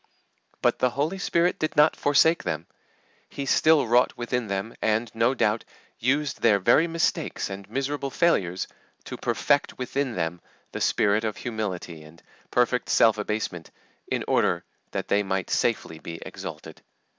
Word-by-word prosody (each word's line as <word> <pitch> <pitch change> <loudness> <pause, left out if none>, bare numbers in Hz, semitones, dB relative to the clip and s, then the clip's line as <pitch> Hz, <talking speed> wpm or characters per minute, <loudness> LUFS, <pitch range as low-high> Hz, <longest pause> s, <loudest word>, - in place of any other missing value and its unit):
But - - +2
the 125 - +3
Holy 150 +10 -2
Spirit 175 -2 +1
did 155 - -2
not 150 +1 +5
forsake 160 +3 +3
them. 80 +2 -3 0.6
He 140 - -5
still 155 +1 +4
wrought 120 +2 +3
within 120 -1 -2
them, 100 +3 -3
and, 110 +1 0
no 115 +4 +2
doubt, 110 -2 +1 0.4
used 140 +4 0
their 110 -3 +5
very 120 - +4
mistakes 165 -10 -1
and 100 +1 -8
miserable 140 +3 -2
failures 95 - +1 0.4
to - - -7
perfect - - 0
within 130 0 -2
them 85 0 -2 0.3
the - - -5
spirit 105 +2 +2
of 110 -2 -2
humility 95 -8 -4
and 80 +2 -16 0.3
perfect 125 0 +1
self 110 -2 +4
abasement 105 -5 -3 0.4
in - - -1
order - - +2 0.3
that - - -4
they 100 - +2
might 95 -2 -2
safely 80 - 0
be 85 - -7
exalted. - - -8
115 Hz, 150 wpm, -25 LUFS, 100-140 Hz, 0.6 s, not